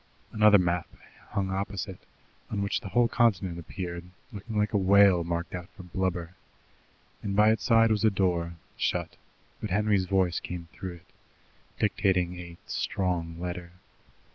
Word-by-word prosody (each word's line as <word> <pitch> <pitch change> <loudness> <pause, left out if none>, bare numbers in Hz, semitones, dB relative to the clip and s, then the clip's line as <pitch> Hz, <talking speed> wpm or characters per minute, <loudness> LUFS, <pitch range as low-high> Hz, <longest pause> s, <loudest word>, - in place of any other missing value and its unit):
Another 105 -1 +6
map 90 -2 0 0.4
hung 95 -1 -1
opposite, 95 -1 -3 0.5
on 100 -2 -1
which 100 - -1
the - - -7
whole 120 +3 +4
continent 100 -8 +1
appeared, 85 0 -6 0.3
looking 105 +2 -5
like 105 +1 +1
a - - +4
whale 100 -2 +5
marked 85 +1 -3
out 90 -1 -6
for 95 - -9
blubber, 90 -1 -2 0.9
and 100 -1 -3
by 105 +1 +6
its 110 - 0
side 115 -2 +5
was 110 0 +1
a 110 - +6
door, 90 -4 0 0.2
shut, - - -1 0.5
but 105 - -3
Henry's 100 0 +2
voice 90 -2 +1
came 85 -1 -6
through 95 -2 -6
it, 85 - -20 0.6
dictating 90 -4 +1
a 85 -1 -9
"strong" 85 -3 -2
letter. 90 0 -5
95 Hz, 150 wpm, -28 LUFS, 90-105 Hz, 0.9 s, Another